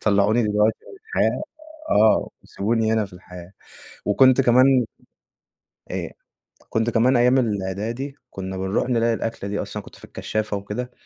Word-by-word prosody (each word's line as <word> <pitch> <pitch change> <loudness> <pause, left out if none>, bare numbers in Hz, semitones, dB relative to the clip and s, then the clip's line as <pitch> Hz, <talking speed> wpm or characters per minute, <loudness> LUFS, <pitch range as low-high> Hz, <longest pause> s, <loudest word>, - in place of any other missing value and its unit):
طلعوني 105 +3 +3
دلوقتي 105 0 +2
من 395 - -13
الحياة - - 0 0.5
آه، 110 +1 +4
وسيبوني 110 +2 -1
هنا 110 -1 +2
في 100 - -21
الحياة، 90 0 -12 0.5
وكنت 130 +5 +5
كمان 130 0 +5 1.1
آآ، - - -4 0.6
كنت 115 +1 0
كمان 120 +2 +3
أيام 125 +2 +4
الإعدادي 110 +5 -3 0.2
كنا 95 0 -6
بنروح 95 +6 -1
نلاقي 115 -1 +2
الأكلة 115 -3 -4
دي 100 - -2
أصلًا - - -7
أنا - - -4
كنت - - -14
في - - -13
الكشافة 110 -1 -3
وكده، 105 +5 -5
110 Hz, 145 wpm, -23 LUFS, 100-120 Hz, 1.1 s, وكنت